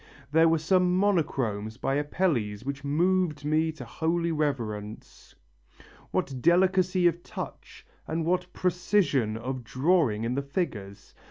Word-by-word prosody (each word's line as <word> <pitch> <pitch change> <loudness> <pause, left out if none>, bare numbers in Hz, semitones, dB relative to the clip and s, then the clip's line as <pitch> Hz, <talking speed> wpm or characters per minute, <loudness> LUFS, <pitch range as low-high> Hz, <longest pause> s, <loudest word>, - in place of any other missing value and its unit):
There 160 +2 +5
were 165 - +3
some 180 +2 +2
monochromes 130 - 0
by 135 - -1
Apelles 140 - -1
which 140 +1 -4
moved 160 0 +1
me 155 +2 +2
to 155 - -9
holy 170 +1 -1
reverence. 115 -9 -4 0.7
What 130 -2 -2
delicacy 185 +2 +3
of 175 0 +2
touch - - -9 0.2
and 160 +1 -2
what 180 +1 0
precision 175 - +1
of 130 +2 -5
drawing 130 - +1
in 115 +2 -1
the 140 - -1
figures! 115 - -5
155 Hz, 125 wpm, -27 LUFS, 125-180 Hz, 0.7 s, There